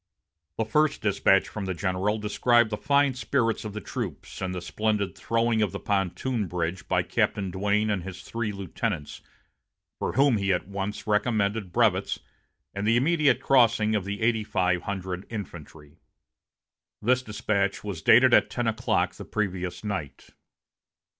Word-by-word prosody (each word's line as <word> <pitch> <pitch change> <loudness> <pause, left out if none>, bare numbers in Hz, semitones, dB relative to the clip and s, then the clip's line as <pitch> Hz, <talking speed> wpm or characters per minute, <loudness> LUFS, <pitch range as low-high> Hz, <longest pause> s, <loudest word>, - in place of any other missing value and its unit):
The 110 - 0
first 150 +3 +1
despatch 95 -1 +3
from 105 -2 -5
the 95 -1 -3
general 95 +3 0
described 115 +2 +2
the - - 0
fine 140 +4 +2
spirits 125 -2 0
of 105 -2 -6
the 110 - -5
troops, - - -6
and 95 -1 -2
the - - -2
splendid 100 +1 -1
throwing 115 +3 +1
of 105 -4 +1
the - - -4
pontoon 100 +3 -1
bridge 90 +1 -3
by - - +1
Captain 95 -3 0
Duane 105 +3 +1
and 100 -3 -1
his 90 0 -8
three 115 -2 -3
lieutenants, 100 -4 -4 0.8
for - - -2
whom 135 -3 +4
he 100 -1 0
at 90 0 -1
once 100 +1 -4
recommended 105 -2 0
brevets, - - +2 0.6
and 100 +1 -3
the 115 +2 +4
immediate 140 -2 +3
crossing 115 -5 +4
of 100 -2 -1
eighty 110 +2 0
five 90 -4 0
hundred 95 -1 -5
infantry. 80 -7 -9 1.0
This 125 +4 +2
despatch 100 -3 -1
was 100 -6 -5
dated 125 +2 +6
at - - +5
ten 120 - -2
o'clock 115 -1 0
the - - -9
previous 95 -4 -3
night. 95 -9 -5
105 Hz, 155 wpm, -26 LUFS, 95-115 Hz, 1.0 s, dated